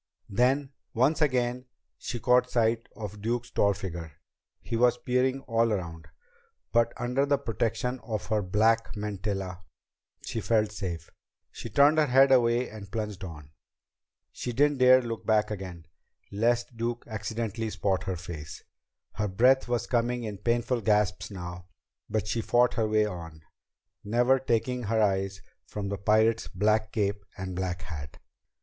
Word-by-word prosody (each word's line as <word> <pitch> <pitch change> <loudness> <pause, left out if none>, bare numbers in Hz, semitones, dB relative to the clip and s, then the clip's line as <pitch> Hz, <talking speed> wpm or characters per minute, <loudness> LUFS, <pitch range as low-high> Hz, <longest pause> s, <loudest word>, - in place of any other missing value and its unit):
Then, 130 +6 +2 0.2
once 135 +8 +2
again, 125 -3 +1 0.3
she 120 - -4
caught 125 +1 +3
sight 115 -1 +1
of 105 -2 -7
Duke's 120 +2 -2
tall 100 -1 +2
figure. 85 -5 -6 0.5
He - - -5
was 120 +1 +4
peering 130 +2 0
all 115 -2 +1
around. 85 -5 -4 0.6
But 115 0 +3
under 125 +3 0
the 140 0 +2
protection 125 +1 -2
of 110 -3 -4
her 110 -2 +2
black 110 +5 +2
mantilla, 100 -3 -4 0.6
she 115 - -3
felt 110 -2 +2
safe. 85 -5 -5 0.4
She 115 - -8
turned 145 +7 +5
her 150 - +3
head 135 +1 +5
away 120 -1 +4
and 105 -2 -10
plunged 105 -4 -4
on. 75 -5 -9 0.8
She 125 - -4
didn't 145 +2 +2
dare 130 0 +7
look 115 -2 -5
back 110 -1 +2
again, 90 -5 -6 0.5
lest 120 +3 0
Duke 120 +1 -2
accidentally 110 +1 -3
spot 95 -2 -1
her 95 -2 -2
face. 80 -4 -8 0.5
Her 105 0 -1
breath 125 +8 +4
was 120 -1 0
coming 120 0 0
in 105 -3 -5
painful 120 +2 0
gasps 105 -3 +1
now, 90 -2 -7 0.4
but 110 -1 -1
she 115 - 0
fought 120 +2 +3
her 110 -2 0
way 110 0 +3
on, 85 -5 -7 0.6
never 120 +5 +3
taking 125 0 0
her 110 +2 +1
eyes 95 -2 0 0.2
from 100 -2 -4
the 100 - -2
pirate's 110 +2 +3
black 105 +3 +1
cape 100 -1 -1
and 95 -2 -5
black 90 0 -3
hat. 75 -5 -7
110 Hz, 150 wpm, -28 LUFS, 100-120 Hz, 0.8 s, dare